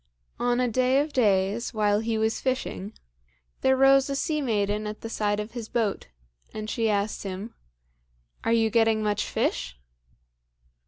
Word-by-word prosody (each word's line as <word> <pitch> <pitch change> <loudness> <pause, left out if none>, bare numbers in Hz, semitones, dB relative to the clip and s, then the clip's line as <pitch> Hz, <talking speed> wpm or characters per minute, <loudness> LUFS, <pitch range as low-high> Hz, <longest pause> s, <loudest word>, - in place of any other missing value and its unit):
On 245 0 +1
a 250 - +2
day 255 +3 +2
of 295 +1 -1
days, 210 -1 +1
while 210 -1 +2
he 225 0 -1
was 220 0 0
fishing, 255 -5 -3 0.7
there 265 0 +3
rose 270 +1 +5
a 275 - -1
sea 305 +2 -1
maiden 210 -4 0
at 210 0 -7
the 225 - -6
side 205 -2 0
of 210 +1 -5
his 230 -2 -7
boat, 220 -4 -1 0.5
and 215 0 -4
she 225 -2 0
asked 205 0 -1
him, 195 +3 -6 0.9
"Are - - 0
you 225 -1 +3
getting 225 -1 +3
much 210 -1 0
fish?" 60 0 -2
220 Hz, 160 wpm, -26 LUFS, 210-250 Hz, 0.9 s, rose